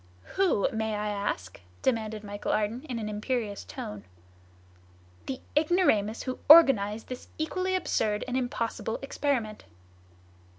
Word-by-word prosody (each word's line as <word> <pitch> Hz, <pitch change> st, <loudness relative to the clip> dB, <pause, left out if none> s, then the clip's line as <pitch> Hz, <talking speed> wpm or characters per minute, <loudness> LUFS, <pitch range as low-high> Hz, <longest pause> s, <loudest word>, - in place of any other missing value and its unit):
"Who, 370 Hz, -, +2 dB
may 220 Hz, -1 st, -1 dB
I 210 Hz, 0 st, -2 dB
ask?" 200 Hz, -, -3 dB, 0.2 s
demanded 220 Hz, -4 st, -1 dB
Michel 205 Hz, 0 st, -4 dB
Ardan 215 Hz, +3 st, 0 dB
in 245 Hz, -, -2 dB
an 220 Hz, -2 st, -4 dB
imperious 215 Hz, 0 st, -2 dB
tone. 105 Hz, -1 st, -7 dB, 1.2 s
"The 260 Hz, -, -4 dB
ignoramus 300 Hz, -, +2 dB
who 255 Hz, -1 st, -4 dB
organized 225 Hz, -10 st, +7 dB
this 255 Hz, -1 st, -8 dB
equally 370 Hz, +4 st, -1 dB
absurd 215 Hz, -, 0 dB
and 250 Hz, -, -3 dB
impossible 230 Hz, -3 st, -2 dB
experiment!" 255 Hz, -6 st, -2 dB
220 Hz, 120 wpm, -28 LUFS, 210-265 Hz, 1.2 s, organized